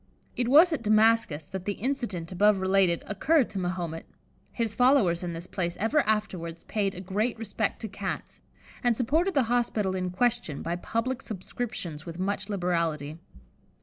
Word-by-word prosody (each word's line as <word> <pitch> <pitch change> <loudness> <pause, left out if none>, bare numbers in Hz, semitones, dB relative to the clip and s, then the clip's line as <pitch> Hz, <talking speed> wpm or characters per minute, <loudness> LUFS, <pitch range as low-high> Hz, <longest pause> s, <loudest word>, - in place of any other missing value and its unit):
It 245 - 0
was 315 +7 +7
at 285 - -2
Damascus 215 -8 +3
that 190 +3 -7
the 205 - 0
incident 210 -9 -3
above 200 +2 +4
related 190 -2 +2
occurred 270 - +2
to 200 - -3
Mahomet. 175 -3 -3 0.4
His 230 -3 -2
followers 245 -10 +4
in 175 -2 -4
this 165 +1 -6
place 175 -2 -3
ever 225 +9 +2
afterwards 185 -6 -1
paid 200 -3 -1
a - - -6
great 210 +6 -1
respect 220 -1 -2
to 220 - -3
Cats, 195 -2 -5 0.4
and 240 -2 +2
supported 320 +10 +1
the 275 - +4
hospital 225 -5 0
in 185 -1 -1
question 230 - 0
by 170 +1 -1
public 235 +8 -2
subscriptions 190 - -5
with 170 0 -6
much 200 +2 -2
liberality. 165 -5 -1
200 Hz, 160 wpm, -28 LUFS, 175-235 Hz, 0.4 s, was